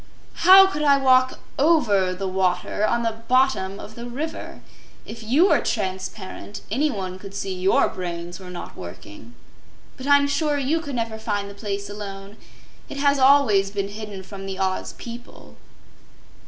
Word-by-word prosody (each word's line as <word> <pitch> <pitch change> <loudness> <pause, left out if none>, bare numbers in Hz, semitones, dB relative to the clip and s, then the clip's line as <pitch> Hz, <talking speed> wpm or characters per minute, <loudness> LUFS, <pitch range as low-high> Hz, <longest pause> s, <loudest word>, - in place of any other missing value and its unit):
"How 385 +1 +11
could 340 -6 -3
I 285 -2 +5
walk 255 -1 +3 0.2
OVER 210 - +3
the 195 +1 -4
water 185 +2 0
on 235 0 0
the 225 -1 -3
BOTTOM 255 -7 +2
of 215 - -10
the 235 +1 -8
river? 295 +7 -6 0.4
If 230 - -9
you 275 - +3
were - - +4
transparent, 190 +2 -4
anyone 210 -8 -1
could 195 0 -10
see 195 -1 -3
YOUR 185 +1 +2
brains 175 -1 -6
were 185 -1 -10
not 180 - -8
working. 100 +6 -11 0.6
But 260 0 -7
I'm 285 0 +5
sure 295 0 0
you 285 +4 0
could 285 -4 -6
never 225 -2 -3
find 205 -2 -3
the - - -10
place 200 -1 -4
alone. 200 0 -8 0.5
It - - -7
has 280 0 +2
always 260 -8 +5
been 200 -1 -3
hidden 205 -2 -7
from 195 0 -9
the 190 -1 -5
Oz 190 -1 -2
people." 240 +1 -11
210 Hz, 160 wpm, -23 LUFS, 190-265 Hz, 0.6 s, How